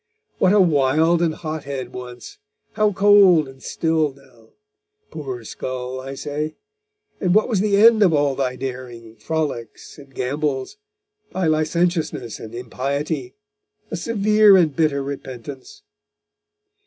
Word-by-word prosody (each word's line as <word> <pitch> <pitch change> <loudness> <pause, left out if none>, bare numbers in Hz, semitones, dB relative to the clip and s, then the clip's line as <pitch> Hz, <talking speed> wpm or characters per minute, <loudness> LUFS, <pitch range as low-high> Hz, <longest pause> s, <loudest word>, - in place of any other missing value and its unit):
What 185 - +4
a 210 - +5
wild 160 0 +3
and 165 -2 +1
hot 155 -2 -6
head 130 -3 -5
once 125 - -9 0.3
how 215 -1 +1
cold 195 -5 +5
and 135 0 -14
still 160 -3 0
now; 130 -4 -22 0.6
poor 130 -6 -6
skull, 130 +3 -5
I 135 +1 -7
say: 150 +3 -4 0.6
and 185 -1 +1
what 215 - +4
was 220 -6 0
the 200 0 +2
end 220 +1 +6
of 190 -4 +5
all 145 -2 +2
thy 130 -1 -2
daring, 125 -3 -7
frolics 150 -6 -4
and 140 -1 -15
gambols 135 - -3 0.6
thy 185 -1 -1
licentiousness 155 - 0
and 110 +1 -9
impiety 135 +3 -4 0.6
a - - -2
severe 210 -2 +4
and 160 -6 +2
bitter 150 -4 +1
repentance. 140 - -8
150 Hz, 130 wpm, -21 LUFS, 130-175 Hz, 0.6 s, end